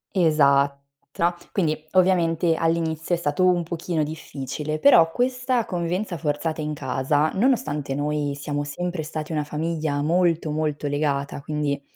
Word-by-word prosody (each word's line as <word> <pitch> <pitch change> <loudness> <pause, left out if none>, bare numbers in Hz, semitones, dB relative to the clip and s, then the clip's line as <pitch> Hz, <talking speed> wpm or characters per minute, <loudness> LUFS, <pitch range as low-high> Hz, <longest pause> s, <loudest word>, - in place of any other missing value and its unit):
Esatta 140 -5 +4 0.8
quindi, 160 -6 +1 0.2
ovviamente, 175 -3 +3
all'inizio 165 0 0
è - - -4
stato 165 +2 0
un 175 -1 +3
pochino 165 -1 -2
difficile, 150 -1 -5
però 165 - +6
questa 250 +2 0
convivenza 180 +2 -2
forzata 155 +1 -2
in 150 0 -3
casa, 145 +3 0
nonostante 155 - 0
noi 145 -1 -1
siamo 145 +1 -3
sempre 175 +4 -3
stati 155 0 -5
una 150 -1 0
famiglia 155 0 -2
molto, 165 -1 +1
molto, 150 -1 -2
legata, 145 -1 -1
quindi, 145 -1 -2
155 Hz, 130 wpm, -24 LUFS, 145-170 Hz, 0.8 s, però